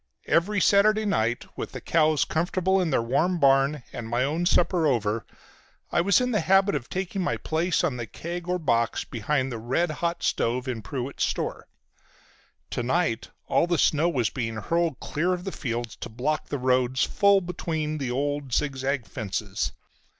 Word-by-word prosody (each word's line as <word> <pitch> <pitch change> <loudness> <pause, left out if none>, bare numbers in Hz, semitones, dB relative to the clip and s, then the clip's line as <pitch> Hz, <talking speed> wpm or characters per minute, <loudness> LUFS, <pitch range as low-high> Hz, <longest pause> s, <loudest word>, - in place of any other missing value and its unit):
Every 200 +5 +2
Saturday 215 +2 +4
night, 120 - 0
with - - -6
the - - -5
cows 155 -2 +2
comfortable 185 +3 +1
in 175 - 0
their 130 -5 +1
warm 155 +10 +1
barn, 135 0 +3
and 115 - -6
my 120 +2 +1
own 160 +6 0
supper 175 -2 +3
over, 115 -4 0 0.6
I - - +3
was 200 +6 +4
in 250 0 0
the 210 - +2
habit 195 +3 +3
of 135 -5 -3
taking 190 +1 -3
my 180 - 0
place 165 +2 0
on 145 -8 0
the 120 -2 -5
keg 175 +6 -6
or 180 0 +1
box 115 -8 +1
behind 130 +3 -1
the 115 - -4
red 130 +9 0
hot 170 +3 -2
stove 125 +3 0
in 120 -3 -3
Pruett's 130 +6 -4
store. - - -3 1.0
To - - -1
night 120 -2 0 0.2
all - - +2
the 175 -1 +1
snow 155 +3 +3
was 125 -9 0
being 115 -4 -3
hurled 165 +6 -1
clear 175 +5 -1
of 180 -1 -4
the 195 - -4
fields 120 -6 -4
to - - -7
block 140 +7 -2
the 145 - -2
roads 130 0 +2
full 200 -1 +4
between 160 -4 -3
the 135 -3 -2
old, 140 0 -2
zigzag 135 -2 0
fences. 105 -3 -3
150 Hz, 180 wpm, -26 LUFS, 125-175 Hz, 1.0 s, Saturday